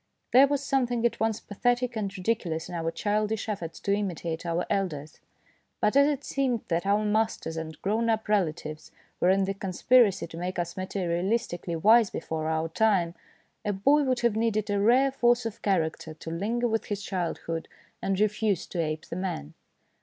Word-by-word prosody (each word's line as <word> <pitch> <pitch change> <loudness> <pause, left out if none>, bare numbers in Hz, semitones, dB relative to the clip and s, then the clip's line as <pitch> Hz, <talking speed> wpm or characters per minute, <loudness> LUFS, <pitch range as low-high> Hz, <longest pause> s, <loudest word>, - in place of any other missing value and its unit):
There 265 +3 +8
was 285 0 -1
something 245 -4 +1
at 235 - +1
once 220 -1 0
pathetic 245 +3 -1
and 205 -3 -2
ridi 185 +5 +2
culous 165 -7 -5
in 180 - -9
our 165 -1 -1
childish 210 +5 -1
efforts 175 -6 -4
to 200 - +1
imitate 175 -4 -3
our 170 +1 0
elders, 155 -7 -2 0.6
but 210 - +2
as 280 +1 +6
it 290 -2 -1
seemed 260 -5 0
that 170 +3 0
our 205 +1 +2
masters 215 -6 0
and 160 -1 -6
grown 225 +4 +1
up 220 0 0
relatives 155 -6 -1 0.3
were 180 - +3
in 195 +1 +4
the 195 - -1
con 195 0 -5
spiracy 235 -2 +4
to 165 - -8
make 180 +2 -3
us 170 -1 -2
materialistically 185 -1 -2
wise 220 +3 +6
before 160 -1 -4
our 160 0 0
time, 185 -3 +2 0.5
a 210 -1 0
boy 275 +10 +4
would 255 -3 0
have 235 -3 +2
needed 215 -2 0
a 200 - +1
rare 255 +6 +4
force 240 -2 +2
of 225 - -5
character 160 -4 -1
to 160 - -8
linger 225 +8 0
with 225 -1 -1
his 205 -1 -4
childhood 170 -3 -3 0.3
and 195 -1 -1
refuse 210 -2 +1
to 175 - -3
ape 155 -1 -3
the - - -6
man. 175 - -4
200 Hz, 185 wpm, -27 LUFS, 170-230 Hz, 0.6 s, There